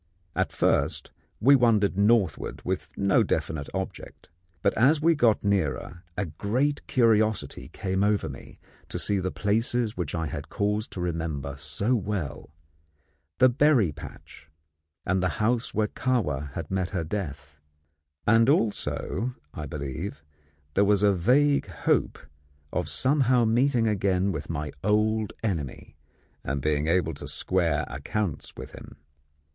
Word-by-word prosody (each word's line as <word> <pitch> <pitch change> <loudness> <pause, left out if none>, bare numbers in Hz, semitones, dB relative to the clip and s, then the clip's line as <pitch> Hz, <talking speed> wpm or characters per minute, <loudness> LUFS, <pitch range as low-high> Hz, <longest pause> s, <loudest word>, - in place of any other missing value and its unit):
At - - 0
first - - 0 0.3
we 140 +5 +6
wandered 110 -6 +3
northward 100 -4 +1
with - - -2
no 100 -1 +3
definite 75 -3 -1
object, - - -6 0.3
but 100 - +3
as 140 +8 +4
we 165 +2 +4
got 120 -8 +3
nearer 95 -3 -1
a 105 - 0
great 115 - -1
curiosity 110 -4 +2
came 95 0 -2
over 105 0 +1
me - - -10 0.3
to - - -3
see 100 -1 0
the 95 0 -1
places 110 +3 0
which 85 -3 -3
I 80 -1 -1
had 75 -1 -6
cause 105 +2 -1
to 90 - -7
remember 80 -5 -3
so 80 - -1
well 100 - -3 0.9
the 130 - +7
berry 130 - +3
patch 75 +1 -12 0.6
and 95 0 +1
the 90 - +1
house 115 +2 +1
where 110 -1 +1
Kahwa 75 - -1
had 80 +1 -6
met 95 -1 0
her 90 -5 -2
death; 75 -5 -5 0.7
and 115 +3 +5
also, 120 -2 0 0.2
I 75 -1 -6
believe, 75 +6 -5 0.5
there 100 - +4
was 100 0 +3
a 100 -1 +5
vague 140 +10 +3
hope - - 0 0.6
of - - -1
somehow 130 -3 +2
meeting 120 +1 +2
again 95 -3 +1
my 75 -2 -3
old 105 +1 +1
enemy 80 - -3 0.5
and 70 +2 -2
being 75 +1 0
able 85 -1 +2
to 70 - -8
square 85 -5 +1
accounts 75 +6 -4
with - - -8
him. - - -11
100 Hz, 140 wpm, -26 LUFS, 80-115 Hz, 0.9 s, the